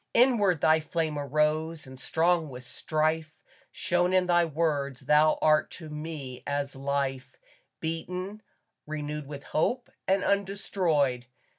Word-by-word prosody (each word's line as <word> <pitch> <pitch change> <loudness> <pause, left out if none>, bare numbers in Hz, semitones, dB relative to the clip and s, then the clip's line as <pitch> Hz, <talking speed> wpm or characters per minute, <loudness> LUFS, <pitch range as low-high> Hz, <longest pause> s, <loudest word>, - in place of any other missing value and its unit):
Inward 210 - +4
thy 160 0 +5
flame 155 -1 -2
arose 155 +3 0
and 130 0 -11
strong 165 +1 +1
with 125 -1 -9
strife 155 +3 -1 0.3
Shone 175 +1 +1
in 185 -1 +4
thy 175 -1 +4
words 145 -4 -1
thou 150 +3 +4
art 155 0 +4
to 160 -3 -9
me 150 -4 -6
as 145 -1 -2
life, 135 -1 -2 0.4
Beaten, 180 +5 -4 0.5
renewed 150 -1 -4
with 140 -1 -8
hope, 245 +10 -1 0.2
and 195 +1 +2
undestroyed. 175 -10 +1
155 Hz, 125 wpm, -28 LUFS, 145-175 Hz, 0.5 s, thy